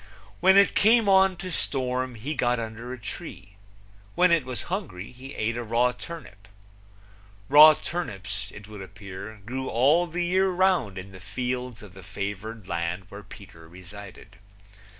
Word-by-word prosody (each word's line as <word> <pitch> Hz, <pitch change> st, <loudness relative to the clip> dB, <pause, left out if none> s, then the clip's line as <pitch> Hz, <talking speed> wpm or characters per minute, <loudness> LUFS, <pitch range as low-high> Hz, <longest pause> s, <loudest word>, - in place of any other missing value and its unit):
When 190 Hz, +2 st, +6 dB
it 200 Hz, -, +6 dB
came 225 Hz, +1 st, +4 dB
on 190 Hz, -1 st, +5 dB
to 185 Hz, +1 st, -7 dB
storm 130 Hz, -4 st, -1 dB
he 130 Hz, +8 st, -4 dB
got 125 Hz, -4 st, +1 dB
under 115 Hz, +2 st, -6 dB
a 130 Hz, -, -5 dB
tree. 100 Hz, -3 st, -8 dB, 0.7 s
When 180 Hz, 0 st, +4 dB
he 170 Hz, -, +5 dB
was 130 Hz, -5 st, -6 dB
hungry 160 Hz, -, -5 dB
he 130 Hz, +2 st, -11 dB
ate 110 Hz, +2 st, -1 dB
a 120 Hz, -, -3 dB
raw 120 Hz, +2 st, +2 dB
turnip. 125 Hz, -, -11 dB, 1.0 s
Raw 150 Hz, +2 st, +9 dB
turnips, 105 Hz, -, -5 dB
it 105 Hz, 0 st, -12 dB
would 105 Hz, -2 st, -9 dB
appear, 100 Hz, +1 st, -9 dB
grew 130 Hz, +3 st, -4 dB
all 145 Hz, +9 st, +3 dB
the 175 Hz, +1 st, -2 dB
year 190 Hz, +2 st, +2 dB
round 180 Hz, -, +1 dB
in 95 Hz, +1 st, -8 dB
the 95 Hz, -, -12 dB
fields 125 Hz, +3 st, -4 dB
of 100 Hz, -4 st, -13 dB
the 95 Hz, -, -12 dB
favored 100 Hz, +2 st, -6 dB
land 85 Hz, +2 st, -2 dB
where 100 Hz, +1 st, -9 dB
Peter 95 Hz, -5 st, -14 dB
resided. 95 Hz, +4 st, -12 dB
120 Hz, 160 wpm, -26 LUFS, 100-165 Hz, 1.0 s, Raw